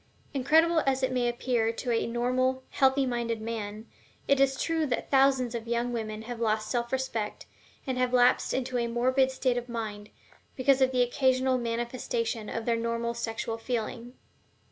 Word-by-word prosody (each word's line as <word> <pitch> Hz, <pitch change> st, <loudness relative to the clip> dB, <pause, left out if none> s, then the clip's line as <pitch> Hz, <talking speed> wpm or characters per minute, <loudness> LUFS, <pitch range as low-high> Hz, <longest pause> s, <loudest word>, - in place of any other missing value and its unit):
Incredible 320 Hz, +5 st, +4 dB
as 265 Hz, 0 st, +1 dB
it 260 Hz, -, +1 dB
may 245 Hz, -1 st, +1 dB
appear 240 Hz, -2 st, 0 dB
to 240 Hz, +2 st, -4 dB
a 230 Hz, -, +1 dB
normal, 255 Hz, +2 st, 0 dB
healthy 270 Hz, 0 st, +3 dB
minded 235 Hz, -2 st, -2 dB
man, 215 Hz, -1 st, -5 dB, 0.4 s
it 280 Hz, -1 st, +3 dB
is 270 Hz, -1 st, +2 dB
true 325 Hz, -2 st, 0 dB
that 250 Hz, -, -3 dB
thousands 265 Hz, -3 st, +3 dB
of 230 Hz, -1 st, -5 dB
young 235 Hz, +1 st, -1 dB
women 220 Hz, -2 st, -4 dB
have 240 Hz, 0 st, -6 dB
lost 215 Hz, -1 st, 0 dB
self 235 Hz, -1 st, -1 dB
respect, 255 Hz, -5 st, -3 dB, 0.4 s
and 260 Hz, -2 st, -2 dB
have 250 Hz, -1 st, +1 dB
lapsed 250 Hz, 0 st, +4 dB
into 255 Hz, -1 st, -1 dB
a 235 Hz, -, 0 dB
morbid 255 Hz, +3 st, +2 dB
state 255 Hz, -1 st, 0 dB
of 245 Hz, 0 st, -4 dB
mind, 215 Hz, -3 st, -5 dB, 0.5 s
because 265 Hz, +1 st, +3 dB
of 260 Hz, 0 st, +4 dB
the 250 Hz, -1 st, +3 dB
occasional 260 Hz, +1 st, +2 dB
manifestation 235 Hz, -1 st, -2 dB
of 230 Hz, -, -4 dB
their 235 Hz, -1 st, +1 dB
normal 230 Hz, 0 st, -2 dB
sexual 225 Hz, -1 st, -4 dB
feeling. 240 Hz, +1 st, -4 dB
245 Hz, 170 wpm, -28 LUFS, 230-260 Hz, 0.5 s, Incredible